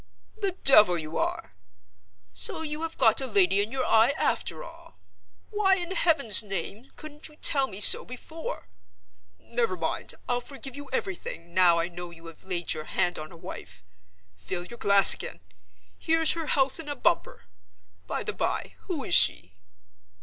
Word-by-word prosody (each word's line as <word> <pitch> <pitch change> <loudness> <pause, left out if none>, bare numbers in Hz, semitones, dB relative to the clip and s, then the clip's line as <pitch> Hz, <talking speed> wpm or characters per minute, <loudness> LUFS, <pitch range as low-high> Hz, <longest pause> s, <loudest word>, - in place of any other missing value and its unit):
"The 400 -4 -2
devil 210 -9 +6
you 155 0 -6
are! 95 - -4 0.8
So 90 - +1
you 300 0 -6
have 330 0 -6
got 225 0 +3
a 265 - -2
lady 360 - +2
in 210 +2 -5
your 265 -1 -3
eye, 225 +5 +2
after - - -3
all? - - -16 0.5
Why 410 -2 +1
in 350 -1 -4
Heaven's 280 - +6
name 205 +4 -5
couldn't 300 0 -11
you 305 - -16
tell 275 -3 +4
me 195 - -7
so - - +8
before? 315 +6 -9 0.7
Never 230 -6 -3
mind, - - -4
I'll 245 0 -1
forgive 270 0 -9
you 285 -1 -10
everything, 170 -7 -6
now 175 -2 +4
I 165 0 -1
know 175 0 -9
you 170 0 -16
have 165 -1 -13
laid 175 -3 -2
your 155 -1 -8
hand 175 +1 -2
on 155 0 -10
a 170 - -14
wife. 160 - -11 0.5
Fill 95 - -6
your 235 +4 -13
glass 200 -1 +7
again. 85 - -7 0.6
Here's 325 -1 +2
her 330 -2 -4
health 270 0 0
in 310 -2 -6
a 290 - -4
bumper. 175 - -2 0.6
By - - -4
the - - -5
by, - - -4
who - - -5
is - - -3
she?" 90 +2 +1
235 Hz, 170 wpm, -25 LUFS, -, 0.8 s, so